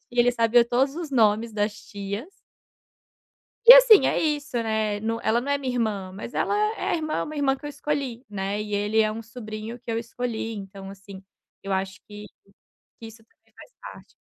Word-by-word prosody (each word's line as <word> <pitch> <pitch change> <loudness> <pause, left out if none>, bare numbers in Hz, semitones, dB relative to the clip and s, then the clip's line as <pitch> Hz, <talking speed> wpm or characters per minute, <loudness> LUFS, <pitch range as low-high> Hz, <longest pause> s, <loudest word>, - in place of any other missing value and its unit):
e 245 0 +2
ele 245 - +4
sabia 235 0 +4
todos 265 +4 0
os 335 -3 -5
nomes 225 -2 +2
das 210 0 -1
tias. 205 - -7 1.4
E - - +14
assim, - - +8
é - - 0
isso, 290 -4 -1
né, 220 -2 -1
no 225 +1 -2
ela 230 +2 +2
não 280 +3 -3
é 285 - +2
minha 265 -2 -3
irmã, 205 -5 -2
mas 205 +5 -8
ela - - 0 0.2
é - - -10
é - - -1
a - - +2
irmã 310 -1 -2
uma 305 - -7
irmã 275 -2 +1
que 275 - -21
eu - - -4
escolhi, 280 -4 -4
né, 200 0 -3
e 210 -1 -5
ele 205 +2 +1
é 215 -1 +3
um 225 +1 -6
sobrinho 220 0 -8
que 240 -1 -7
eu 225 - -1
escolhi, 230 -1 -4
então 195 -1 -9
assim, 195 0 -12 0.4
eu 195 - -6
acho 190 0 -2
que 210 0 -10 0.7
que 225 - -9
isso 225 0 -14
também - - -37
faz - - -15
parte. - - -12
225 Hz, 205 wpm, -24 LUFS, 210-260 Hz, 1.4 s, E